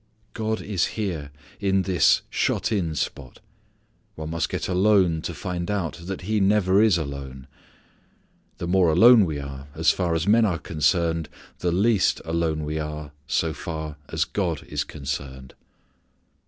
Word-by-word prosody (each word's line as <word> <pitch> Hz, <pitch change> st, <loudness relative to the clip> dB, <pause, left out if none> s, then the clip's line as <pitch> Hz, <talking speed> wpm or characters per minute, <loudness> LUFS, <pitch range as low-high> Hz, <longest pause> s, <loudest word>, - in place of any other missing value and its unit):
God 110 Hz, 0 st, -2 dB
is 100 Hz, -4 st, 0 dB
here 85 Hz, -9 st, -3 dB, 0.3 s
in 95 Hz, -1 st, +1 dB
this 90 Hz, -4 st, +3 dB
shut -, -, 0 dB
in 85 Hz, -7 st, -1 dB
spot. 70 Hz, -3 st, -4 dB, 0.8 s
One 80 Hz, 0 st, -6 dB
must 85 Hz, -2 st, -1 dB
get -, -, -3 dB
alone 95 Hz, -3 st, +3 dB
to 85 Hz, -, -4 dB
find 90 Hz, -1 st, -4 dB
out 95 Hz, -5 st, -2 dB
that 95 Hz, -1 st, -4 dB
he 105 Hz, +4 st, 0 dB
never 100 Hz, -1 st, +3 dB
is 110 Hz, -5 st, +4 dB
alone. 70 Hz, -4 st, -6 dB, 1.1 s
The -, -, -4 dB
more 90 Hz, -1 st, +3 dB
alone 110 Hz, +6 st, +7 dB
we 80 Hz, -4 st, -3 dB
are 70 Hz, 0 st, -8 dB
as 80 Hz, +1 st, +4 dB
far 85 Hz, -3 st, -1 dB
as 80 Hz, 0 st, 0 dB
men 110 Hz, +3 st, +5 dB
are 95 Hz, -6 st, +1 dB
concerned 80 Hz, 0 st, 0 dB, 0.3 s
the 90 Hz, -, 0 dB
least 100 Hz, +3 st, +2 dB
alone 80 Hz, -2 st, -1 dB
we 75 Hz, +1 st, -3 dB
are 75 Hz, -1 st, -5 dB, 0.2 s
so 80 Hz, +2 st, 0 dB
far 80 Hz, -1 st, -6 dB
a; -, -, -6 dB, 0.2 s
God 85 Hz, -7 st, -1 dB
is -, -, -3 dB
concerned. 65 Hz, -2 st, -6 dB
85 Hz, 155 wpm, -24 LUFS, 75-95 Hz, 1.1 s, alone